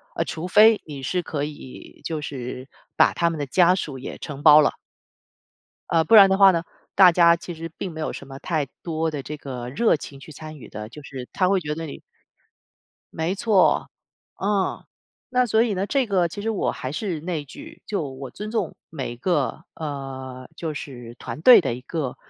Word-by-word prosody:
呃， - - +1
除 165 +2 -5
非 215 +3 +6
你 145 -3 -8
是 180 +7 -1
可 150 -3 -4
以 145 -3 -9
就 160 -2 -3
是 130 -2 -6 0.3
把 - - +5
他 170 - +1
们 160 -2 -5
的 145 - -1
家 180 +6 +4
属 145 -7 -4
也 130 - -7
承 145 -1 -8
包 155 -1 +9
了。 - - +1 1.1
呃， 165 -1 +3
不 225 - +5
然 200 -2 +9
的 190 - +2
话 195 -1 +8
呢 170 -2 -1 0.3
大 185 -2 +8
家 170 0 +6
其 170 +1 -8
实 165 +1 -7
并 190 - -4
没 160 - -9
有 155 - -2
什 140 - -9
么 135 0 -9
太 155 -3 -1 0.2
多 160 -1 -2
的 145 -2 -4
这 150 +2 -7
个 125 -4 -6
热 220 - +2
情 140 -1 -10
去 155 - -12
参 155 +2 -9
与 130 - -12
的。 105 0 -7
就 150 +5 -12
是 130 -3 -8
他 185 - +2
会 195 -1 +3
觉 150 -2 -4
得 165 +1 -5
你 145 - -9 1.1
没 165 +4 -1
错， 200 -2 +3 0.5
嗯。 200 -1 0 0.5
那 250 -1 +2
所 220 -1 +3
以 225 -4 0
呢 190 +1 -1
这 270 +4 +1
个 185 -4 +2
其 205 - -7
实 225 - -2
我 220 - 0
还 130 +2 -6
是 175 -1 -3
那 165 0 -3
一 145 - -13
句 310 - -12
就 205 -4 -2
我 130 -1 -8
尊 210 +1 -7
重 225 - -2
每 135 -6 -5
一 - - -10
个， 170 +1 -1
呃， 135 -4 -6
就 160 -2 -4
是 120 -5 -8
团 - - -7
队 250 +8 +9
的 120 - -1
一 125 - -7
个 140 -1 -4
160 Hz, 225 characters per minute, -23 LUFS, 140-185 Hz, 1.1 s, 包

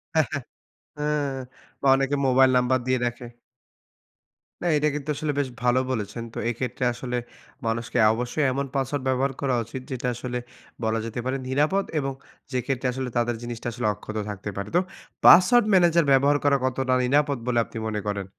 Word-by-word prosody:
হ্যাঁ, 160 -2 +4
হ্যাঁ, 145 -2 -2 0.6
হ্যাঁ। 150 -2 -1 0.4
বা 140 - -3
অনেকে 135 +1 +1
মোবাইল 130 0 +5
নাম্বার 125 +1 +2
দিয়ে 130 0 +2
রাখে। 120 0 -4 1.4
না, - - 0
এটা 150 +1 +2
কিন্তু 150 0 -5
আসলে 150 +1 -1
বেশ 135 -2 0
ভালো 125 +1 +3
বলেছেন। 110 -1 -3
তো - - -8
এক্ষেত্রে 125 +2 -3
আসলে 125 +1 -4 0.5
মানুষকে 115 +2 -2 0.2
অবশ্যই 125 +6 -1
এমন 140 +2 -1
পাসওয়ার্ড 135 0 -1
ব্যবহার 130 +1 +1
করা 135 -3 +1
উচিত, 115 +4 -7
যেটা 125 -1 -3
আসলে 125 +1 -4 0.5
বলা 110 0 +1
যেতে 115 +1 -5
পারে 130 +1 -1
নিরাপদ 150 +9 +1
এবং 135 -1 -2 0.4
যে 130 - -1
ক্ষেত্রে 130 -2 -1
আসলে 130 0 -3
তাদের 120 0 +1
জিনিসটা 120 0 -5
আসলে 120 -1 -2
অক্ষত 110 +2 -8
থাকতে 105 0 -5
পারে। 100 +1 -4
তো - - +6 0.5
পাসওয়ার্ড 240 +6 +8
ম্যানেজার 170 -3 +5
ব্যবহার 140 +2 +5
করা 140 -1 +4
কতটা 130 0 0
নিরাপদ 140 +2 +2
বলে 120 -1 +2
আপনি - - -10
মনে 105 -1 -2
করেন? 100 -1 -2
130 Hz, 175 wpm, -25 LUFS, 120-140 Hz, 1.4 s, পাসওয়ার্ড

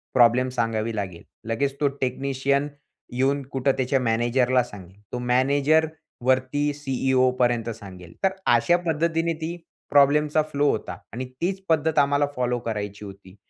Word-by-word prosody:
Problem 125 +1 +5
सांगावी 115 -2 -1
लागेल. 95 -5 -5 0.3
लगेच 135 +4 0
तो 145 - +4
टेक्निशियन 140 +2 0 0.5
येऊन 135 +3 +1
कुठं 135 +1 +1
त्याच्या 130 +1 +1
मॅनेजरला 120 +2 +2
सांगेल. 100 -3 -13
तो 125 - -2
मॅनेजर 140 +6 +2 0.4
वरती 130 +3 +1
सीईओपर्यंत 130 -4 +1
सांगेल. 95 -6 -10
तर 190 - +4 0.2
अशा 175 +10 +3
पद्धतीने 165 +1 +1
ती 165 +2 -3 0.3
प्रॉब्लेमचा 150 +2 +4
फ्लो 145 0 +2
होता - - -4 0.2
आणि 130 +2 -4 0.2
तीच 190 +2 -1
पद्धत 160 -1 +2
आम्हाला 140 0 +3
फॉलो 125 -1 0
करायची 105 -3 -5
होती. 95 -1 -12
130 Hz, 135 wpm, -24 LUFS, 115-145 Hz, 0.5 s, Problem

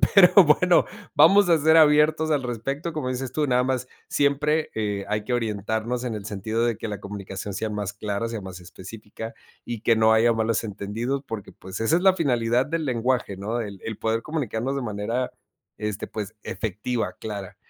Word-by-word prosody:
pero 185 -3 +8
bueno, 175 +4 +4 0.3
vamos 190 +5 +6
a 165 - +6
ser 160 +1 +4
abiertos 155 0 +5
al 145 -3 +1
respecto, 135 +7 -3
como 150 -5 -3
dices 130 0 -4
tú, 150 - +1
nada 125 -1 +3
más, 130 -1 -2 0.2
siempre, 145 +2 +1
eh, 105 -2 -2
hay 105 0 -1
que 125 - -2
orientarnos 110 +2 -2
en 120 -3 -2
el 105 - -6
sentido 110 +3 -1
de 115 -3 0
que 115 - -5
la 105 -2 -5
comunicación 100 0 -6
sea 110 +3 -2
más 105 -2 -3
clara, 105 +2 -3
sea 115 -1 -4
más 95 -2 -9
específica, 105 +5 -9 0.3
y 120 -2 -5
que 115 -1 +3
no 110 0 +5
haya 115 +2 +4
malos 115 0 0
entendidos, 110 +6 -3
porque 110 -3 -6
pues, 95 +2 -8
esa 115 +9 +3
es - - -1
la 190 0 +6
finalidad 125 -6 +1
del 160 +1 -2
lenguaje, 125 -4 0
¿no? 105 +5 -3
El 100 -4 -6
el 110 -2 -5
poder 115 0 0
comunicarnos 135 -3 -2
de - - -2
manera, 115 +3 -2 0.5
este 105 -1 -3
pues 105 -1 -6
efectiva, 105 +1 -3
clara. 100 -3 -6
115 Hz, 190 wpm, -24 LUFS, 105-135 Hz, 0.5 s, pero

